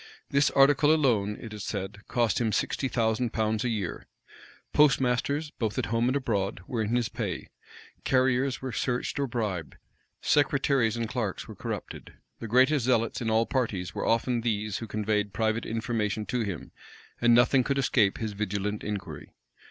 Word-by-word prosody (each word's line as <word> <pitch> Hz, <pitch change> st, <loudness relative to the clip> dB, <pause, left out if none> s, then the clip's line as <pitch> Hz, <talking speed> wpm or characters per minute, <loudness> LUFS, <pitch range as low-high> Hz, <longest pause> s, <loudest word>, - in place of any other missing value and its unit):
This 140 Hz, 0 st, +4 dB
article 145 Hz, +2 st, +5 dB
alone, 115 Hz, -10 st, +2 dB
it 110 Hz, -2 st, -8 dB
is 105 Hz, -2 st, -6 dB
said, 100 Hz, 0 st, -5 dB
cost 120 Hz, -3 st, +1 dB
him 115 Hz, -2 st, +1 dB
sixty 135 Hz, -, 0 dB
thousand 115 Hz, -1 st, 0 dB
pounds 110 Hz, +1 st, 0 dB
a 125 Hz, -, 0 dB
year. 100 Hz, -7 st, -3 dB, 0.7 s
Postmasters, 140 Hz, +1 st, +2 dB
both 110 Hz, -3 st, -3 dB
at -, -, 0 dB
home 115 Hz, +2 st, +2 dB
and 130 Hz, -, 0 dB
abroad, 105 Hz, -9 st, -1 dB
were 120 Hz, -3 st, -2 dB
in 110 Hz, +2 st, 0 dB
his 120 Hz, -2 st, +1 dB
pay: -, -, -4 dB, 0.5 s
carriers 130 Hz, 0 st, +1 dB
were 130 Hz, -, -3 dB
searched 125 Hz, +4 st, -2 dB
or 140 Hz, -, 0 dB
bribed: 105 Hz, -, -3 dB, 0.4 s
secretaries 135 Hz, -5 st, +2 dB
and 115 Hz, -1 st, -2 dB
clerks 110 Hz, -5 st, -3 dB
were -, -, -8 dB
corrupted -, -, -6 dB, 0.3 s
the 115 Hz, -, -5 dB
greatest 130 Hz, +3 st, +4 dB
zealots 115 Hz, -2 st, +1 dB
in 115 Hz, -, -1 dB
all 110 Hz, +1 st, +3 dB
parties 110 Hz, -10 st, -2 dB
were -, -, -3 dB
often 115 Hz, +1 st, +1 dB
these 105 Hz, -3 st, -1 dB
who 115 Hz, -, -6 dB
conveyed 105 Hz, -1 st, -1 dB
private 110 Hz, 0 st, 0 dB
information 110 Hz, -2 st, -2 dB
to 125 Hz, +2 st, -2 dB
him: 100 Hz, -8 st, -4 dB, 0.5 s
and 120 Hz, -1 st, +6 dB
nothing 125 Hz, +2 st, +5 dB
could 140 Hz, +2 st, -1 dB
escape 115 Hz, -7 st, +2 dB
his 110 Hz, -2 st, -3 dB
vigilant 105 Hz, 0 st, -2 dB
inquiry. 105 Hz, -2 st, -5 dB
115 Hz, 165 wpm, -28 LUFS, 105-130 Hz, 0.7 s, and